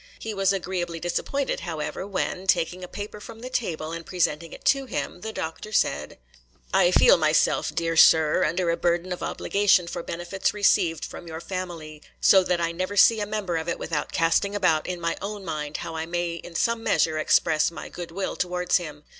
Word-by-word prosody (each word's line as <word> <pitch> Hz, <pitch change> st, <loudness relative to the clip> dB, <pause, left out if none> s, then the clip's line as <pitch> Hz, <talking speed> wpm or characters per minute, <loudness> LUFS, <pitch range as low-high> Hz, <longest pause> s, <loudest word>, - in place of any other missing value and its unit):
He 220 Hz, -, -5 dB
was 195 Hz, -1 st, +2 dB
agreeably 180 Hz, -3 st, -3 dB
disappointed, 265 Hz, -, -2 dB
however, 170 Hz, +1 st, -4 dB
when, 190 Hz, -1 st, -3 dB
taking 180 Hz, 0 st, +1 dB
a -, -, -6 dB
paper 205 Hz, +3 st, -7 dB
from 225 Hz, +1 st, -11 dB
the 255 Hz, +1 st, -7 dB
table, 160 Hz, -10 st, -2 dB
and 165 Hz, 0 st, -5 dB
presenting 165 Hz, -2 st, -1 dB
it -, -, -12 dB
to 275 Hz, -1 st, +3 dB
him, 180 Hz, -, -4 dB
the 220 Hz, -, -5 dB
Doctor 165 Hz, +3 st, -6 dB
said,— 75 Hz, -, 0 dB, 0.6 s
'I 190 Hz, -2 st, +5 dB
feel 180 Hz, -, +6 dB
myself, 155 Hz, -1 st, +2 dB
my -, -, -10 dB
dear 165 Hz, 0 st, -1 dB
sir, 160 Hz, -1 st, +6 dB
under 170 Hz, +2 st, +1 dB
a 170 Hz, -, -1 dB
burden 175 Hz, +1 st, 0 dB
of 180 Hz, -, -8 dB
obligation 200 Hz, -3 st, +2 dB
for 170 Hz, 0 st, -5 dB
benefits 175 Hz, +5 st, -3 dB
received 180 Hz, -5 st, +2 dB
from 175 Hz, -, -10 dB
your 160 Hz, 0 st, -6 dB
family, 170 Hz, -5 st, -6 dB, 0.2 s
so 190 Hz, -1 st, +6 dB
that 180 Hz, -1 st, 0 dB
I 170 Hz, 0 st, 0 dB
never 185 Hz, +4 st, -4 dB
see 225 Hz, +2 st, +6 dB
a 205 Hz, -, -2 dB
member 200 Hz, -5 st, -2 dB
of 160 Hz, +1 st, -3 dB
it -, -, -1 dB
without 150 Hz, -3 st, -3 dB
casting 180 Hz, +5 st, +1 dB
about 165 Hz, -6 st, +2 dB
in 180 Hz, -1 st, -3 dB
my 170 Hz, 0 st, -2 dB
own 200 Hz, -1 st, -5 dB
mind 150 Hz, -2 st, -4 dB
how 165 Hz, -, -6 dB
I 160 Hz, 0 st, -3 dB
may 175 Hz, 0 st, -2 dB
in 170 Hz, +1 st, -9 dB
some 230 Hz, +5 st, +1 dB
measure 160 Hz, -7 st, +1 dB
express 155 Hz, 0 st, +3 dB
my 170 Hz, -, -8 dB
good 175 Hz, -1 st, -8 dB
will 190 Hz, +3 st, -3 dB
towards 180 Hz, 0 st, +1 dB
him. 150 Hz, -4 st, -8 dB
175 Hz, 205 wpm, -25 LUFS, 165-195 Hz, 0.6 s, feel